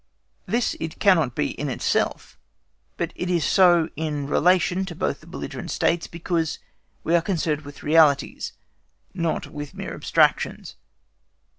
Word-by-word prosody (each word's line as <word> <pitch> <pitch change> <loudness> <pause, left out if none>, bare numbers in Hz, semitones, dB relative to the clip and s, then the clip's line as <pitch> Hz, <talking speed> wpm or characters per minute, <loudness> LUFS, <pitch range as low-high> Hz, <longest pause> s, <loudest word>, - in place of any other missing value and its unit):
This 235 +5 0
it 160 -1 -5
cannot 165 - +3
be 150 - 0
in 145 - -4
itself, 125 - -1 0.6
but - - -3
it 180 - -3
is 175 -3 +1
so 175 -4 +5
in 150 -2 -3
relation 180 +5 +2
to 175 -3 -7
both - - -2
the - - -17
belligerent - - -6
States, 170 0 0
because 165 -1 -2 0.5
we 165 - 0
are 170 - +4
concerned 165 -4 -1
with 145 -1 -12
realities, 150 -2 +3 0.6
not 170 -3 -1
with 145 -2 -8
mere - - -6
abstractions. - - +1
165 Hz, 140 wpm, -24 LUFS, 150-180 Hz, 0.6 s, so